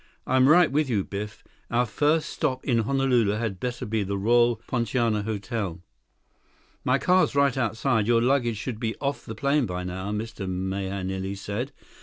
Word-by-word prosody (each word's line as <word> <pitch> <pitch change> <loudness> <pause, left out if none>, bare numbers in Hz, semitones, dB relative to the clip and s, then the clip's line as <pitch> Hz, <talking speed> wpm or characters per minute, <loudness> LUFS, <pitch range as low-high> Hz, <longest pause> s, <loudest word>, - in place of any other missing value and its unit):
"I'm 130 +1 +4
right 170 -2 +6
with 145 0 +1
you, 105 -5 +1
Biff. 105 +2 -6 0.3
Our 120 +1 +2
first 150 +7 +1
stop 130 -1 -2
in 120 -4 +2
Honolulu 125 -3 +2
had 105 -4 -3
better 125 -1 -3
be 110 0 -1
the 100 0 -2
Royal 120 +3 +4
Poinciana 115 -2 0
Hotel." 100 -4 -4 1.0
"My 125 +1 +3
car's 180 -1 +3
right 140 -2 +3
outside. 115 -2 0
Your 120 -1 +4
luggage 120 -2 +2
should 115 0 -5
be 115 -2 -2
off 140 0 -3
the 110 - -5
plane 140 +1 +1
by 90 0 -4
now," 95 +2 -4
Mr. 105 -2 -4
Mahenili 95 +1 -3
said. 105 +7 -4
115 Hz, 165 wpm, -26 LUFS, 100-130 Hz, 1.0 s, right